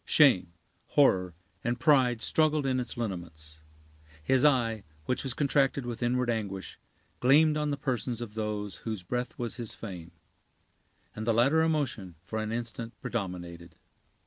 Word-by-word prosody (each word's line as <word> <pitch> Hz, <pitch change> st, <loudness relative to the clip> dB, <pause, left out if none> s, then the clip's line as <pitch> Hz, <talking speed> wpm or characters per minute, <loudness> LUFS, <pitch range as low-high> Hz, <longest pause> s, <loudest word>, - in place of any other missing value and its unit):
Shame, 95 Hz, -, +4 dB, 0.4 s
horror, 90 Hz, -, +3 dB, 0.3 s
and 120 Hz, +1 st, -1 dB
pride 130 Hz, -6 st, +4 dB
struggled 155 Hz, -2 st, +2 dB
in 130 Hz, -1 st, +1 dB
its 125 Hz, -1 st, -4 dB
lineaments. 85 Hz, -8 st, -6 dB, 0.6 s
His 130 Hz, +11 st, +3 dB
eye, 120 Hz, -7 st, +3 dB, 0.2 s
which 125 Hz, -, -1 dB
was 130 Hz, -2 st, -3 dB
contracted 140 Hz, -2 st, +2 dB
with 120 Hz, -1 st, -5 dB
inward 125 Hz, +1 st, +1 dB
anguish, 100 Hz, -5 st, -3 dB, 0.4 s
gleamed 150 Hz, +4 st, +5 dB
on 150 Hz, -1 st, 0 dB
the 145 Hz, -, -1 dB
persons 125 Hz, -3 st, -2 dB
of 115 Hz, -3 st, -6 dB
those 105 Hz, -3 st, -3 dB
whose 110 Hz, -5 st, -5 dB
breath 125 Hz, +6 st, -3 dB
was 120 Hz, -1 st, -4 dB
his 120 Hz, -3 st, -5 dB
fame; 90 Hz, -6 st, -8 dB, 1.1 s
and 110 Hz, +1 st, -5 dB
the 115 Hz, -, +3 dB
latter 135 Hz, +7 st, +4 dB
emotion 135 Hz, -, -1 dB
for 110 Hz, +3 st, -4 dB
an 110 Hz, 0 st, -3 dB
instant 115 Hz, 0 st, -5 dB
predominated. 85 Hz, -6 st, -5 dB
120 Hz, 145 wpm, -29 LUFS, 100-130 Hz, 1.1 s, gleamed